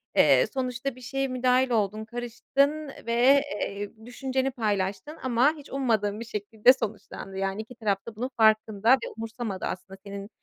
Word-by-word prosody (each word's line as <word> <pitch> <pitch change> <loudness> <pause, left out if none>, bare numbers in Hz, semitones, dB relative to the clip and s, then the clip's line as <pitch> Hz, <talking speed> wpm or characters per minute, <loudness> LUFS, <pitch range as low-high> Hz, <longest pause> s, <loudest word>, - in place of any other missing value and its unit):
eee, - - +6
sonuçta 255 0 -2
bir 255 - -14
şeye 270 +2 -2
müdahil 255 0 +2
oldun, 215 -1 0
karıştın 275 +6 -1 0.2
ve, 250 +4 +5 0.2
eee, 200 +1 -3
düşünceni 265 +2 -1
paylaştın 205 +4 -2
ama 260 +4 +3
hiç 290 - -12
ummadığın 220 -6 0
bir 230 - -6
şekilde 220 +3 +3
sonuçlandı. 205 -4 -6
Yani 195 +2 -1
2 230 +3 -12
taraf 205 -4 -1
da 225 - -7
bunun 250 +4 -3
farkında 220 +1 +4
ve 265 - +1
umursamadı 225 -3 -4
aslında 190 +1 -6
senin, 200 +1 -7
230 Hz, 155 wpm, -27 LUFS, 205-260 Hz, 0.2 s, eee